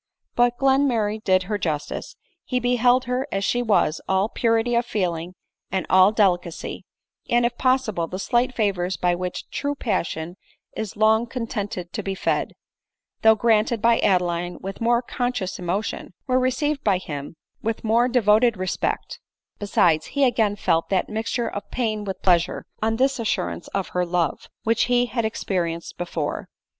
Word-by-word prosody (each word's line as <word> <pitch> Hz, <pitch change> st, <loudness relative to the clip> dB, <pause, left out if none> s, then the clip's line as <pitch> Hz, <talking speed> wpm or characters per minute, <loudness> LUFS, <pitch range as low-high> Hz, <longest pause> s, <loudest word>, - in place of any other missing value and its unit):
But 240 Hz, 0 st, +2 dB
Glenmurray 245 Hz, -6 st, +2 dB
did 185 Hz, -1 st, +3 dB
her 205 Hz, +2 st, -3 dB
justice; 160 Hz, -, -3 dB, 0.3 s
he 250 Hz, -, -1 dB
beheld 245 Hz, +1 st, +3 dB
her. 250 Hz, +2 st, -2 dB
as 195 Hz, 0 st, -1 dB
she 245 Hz, -, +1 dB
was 205 Hz, -8 st, +2 dB
— -, -, -19 dB
all 190 Hz, +2 st, +2 dB
purity 230 Hz, 0 st, +1 dB
01 235 Hz, 0 st, +3 dB
feeling 180 Hz, -7 st, -2 dB, 0.4 s
and 190 Hz, 0 st, -1 dB
all 190 Hz, +2 st, +7 dB
delicacy; 180 Hz, -6 st, 0 dB, 0.4 s
and, 240 Hz, 0 st, +3 dB
if 240 Hz, 0 st, 0 dB
possible, 255 Hz, -10 st, +1 dB
the 185 Hz, -, -5 dB
slight 240 Hz, +5 st, 0 dB
favors 190 Hz, -4 st, 0 dB
by 180 Hz, -1 st, +2 dB
which 180 Hz, +1 st, -4 dB
true 285 Hz, 0 st, -2 dB
passion 175 Hz, -, -2 dB, 0.4 s
is 215 Hz, -2 st, -5 dB
long 220 Hz, +2 st, +3 dB
contented 205 Hz, -7 st, -4 dB
to -, -, -2 dB
be 195 Hz, -1 st, -3 dB
fed, -, -, -1 dB, 0.7 s
though 220 Hz, 0 st, +6 dB
granted 225 Hz, +1 st, +2 dB
by 230 Hz, +1 st, +3 dB
Adeline 175 Hz, -2 st, +1 dB
with 195 Hz, +3 st, -7 dB
more 235 Hz, +1 st, +2 dB
conscious 245 Hz, -6 st, -3 dB
emotion, 185 Hz, +1 st, -3 dB
were 255 Hz, -1 st, +2 dB
received 275 Hz, +3 st, 0 dB
by 200 Hz, -3 st, +3 dB
him 145 Hz, -4 st, -7 dB, 0.3 s
with 225 Hz, 0 st, -3 dB
more 230 Hz, +2 st, +3 dB
de 250 Hz, 0 st, +2 dB
voted 215 Hz, +2 st, +4 dB
respect: 185 Hz, 0 st, -2 dB, 0.4 s
besides, 170 Hz, -6 st, +2 dB
he 280 Hz, -, +4 dB
again 220 Hz, -5 st, +2 dB
felt 165 Hz, -4 st, 0 dB
that 190 Hz, -2 st, 0 dB
mixture 225 Hz, +2 st, -2 dB
of 205 Hz, -, -6 dB
pain 215 Hz, -4 st, -2 dB
with 195 Hz, -1 st, -5 dB
pleasure, 175 Hz, -1 st, +2 dB, 0.2 s
on 220 Hz, +1 st, +1 dB
this 265 Hz, +2 st, +1 dB
assurance 225 Hz, -, -2 dB
of 195 Hz, -1 st, -3 dB
her 180 Hz, -, 0 dB
love, 170 Hz, -3 st, -1 dB
which 225 Hz, 0 st, +2 dB
he 245 Hz, 0 st, +3 dB
had 235 Hz, -2 st, -2 dB
experienced 170 Hz, -6 st, -2 dB
before. 170 Hz, -4 st, -3 dB
215 Hz, 165 wpm, -23 LUFS, 185-240 Hz, 0.7 s, all